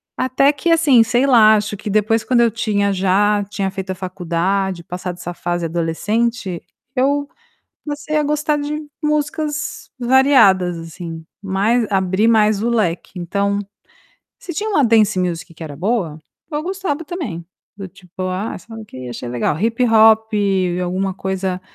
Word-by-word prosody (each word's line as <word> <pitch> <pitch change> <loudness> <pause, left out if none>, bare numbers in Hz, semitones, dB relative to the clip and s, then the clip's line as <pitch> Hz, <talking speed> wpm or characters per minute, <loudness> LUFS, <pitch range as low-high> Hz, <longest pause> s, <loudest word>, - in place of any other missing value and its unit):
até 275 +3 +2
que 310 +5 -2
assim, 290 -8 +5
sei 245 +4 +1
lá, 220 -5 +6
acho 210 0 -1
que 210 - -6
depois 215 +2 +2
quando 245 -2 +2
eu 230 -2 +3
tinha 205 -3 0
já 200 +2 +2
tinha 195 -2 -2
feito 190 -1 -6
a - - -3
faculdade, 185 0 -2
passado 180 +1 -5
essa 175 0 -6
fase 175 0 -3
adolescente, 185 +4 -1 0.3
eu 285 +2 +1 0.6
comecei 295 +1 -4
a 300 - +2
gostar 300 0 0
de 300 +1 -4 0.2
músicas 300 0 -2
variadas, 235 -9 +4
assim, 165 0 -8 0.2
mais 205 +5 +1
abri 190 +3 +2
mais 215 -2 +3
o 235 - +1
leque. 185 -5 -1
Então, 200 +3 -1 0.8
se 350 - -7
tinha 430 +4 -2
uma 295 -9 +3
dance 215 -4 +3
music 170 -2 -3
que 160 - -8
era 145 -2 -8
boa, 180 -4 -1 0.3
eu 295 +1 -1
gostava 360 -4 -3
também, 265 - -5 0.3
do 195 -2 -7
tipo: 185 +1 -10
"Ah, 185 +4 -3
sei 225 - -13
lá - - -7
o - - -10
quê, 130 -9 -9
achei 120 +1 -6
legal.", 120 +4 -1
hip-hop 220 0 +4
e 190 -3 +1
alguma 185 +2 -1
coisa, 190 -1 -3
205 Hz, 160 wpm, -19 LUFS, 185-250 Hz, 0.8 s, lá